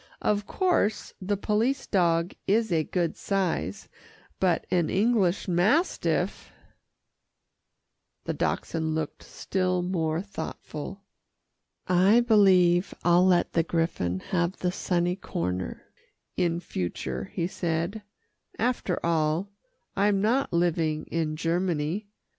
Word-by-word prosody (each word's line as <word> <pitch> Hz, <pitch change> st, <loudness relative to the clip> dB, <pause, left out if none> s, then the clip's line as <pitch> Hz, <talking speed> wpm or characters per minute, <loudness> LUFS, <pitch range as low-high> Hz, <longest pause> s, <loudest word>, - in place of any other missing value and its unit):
"Of 205 Hz, -1 st, +1 dB
course 360 Hz, -, 0 dB
the 200 Hz, +2 st, -1 dB
police 225 Hz, +7 st, 0 dB
dog 170 Hz, -3 st, +1 dB
is 220 Hz, +1 st, +2 dB
a 160 Hz, -2 st, +2 dB
good 170 Hz, 0 st, -1 dB
size, 185 Hz, -, -2 dB, 0.5 s
but 180 Hz, -3 st, +1 dB
an 175 Hz, -3 st, +2 dB
English 205 Hz, -3 st, +2 dB
mastiff 200 Hz, -, +1 dB, 0.9 s
" -, -, -54 dB
The -, -, -1 dB
Dachshund 160 Hz, -1 st, -1 dB
looked 160 Hz, -2 st, -3 dB
still 185 Hz, -1 st, -1 dB
more 165 Hz, -2 st, -1 dB
thoughtful. 195 Hz, -1 st, -7 dB, 0.8 s
"I 185 Hz, +5 st, +5 dB
believe 190 Hz, -6 st, +4 dB
I'll 175 Hz, +1 st, +5 dB
let 180 Hz, -2 st, +3 dB
the 165 Hz, -, +3 dB
griffon 165 Hz, -, -1 dB
have 175 Hz, 0 st, 0 dB
the 180 Hz, -, -1 dB
sunny 180 Hz, 0 st, 0 dB
corner 90 Hz, -, -4 dB, 0.5 s
in 170 Hz, -1 st, 0 dB
future," 85 Hz, -, -4 dB
he 170 Hz, -, 0 dB
said. 175 Hz, +3 st, -2 dB, 0.6 s
"After 235 Hz, -6 st, 0 dB
all, 165 Hz, +3 st, +1 dB, 0.5 s
I'm 200 Hz, 0 st, +2 dB
not 235 Hz, +7 st, +1 dB
living 165 Hz, -3 st, +1 dB
in 160 Hz, -2 st, -1 dB
Germany. 170 Hz, +3 st, -1 dB
180 Hz, 110 wpm, -27 LUFS, 165-200 Hz, 0.9 s, I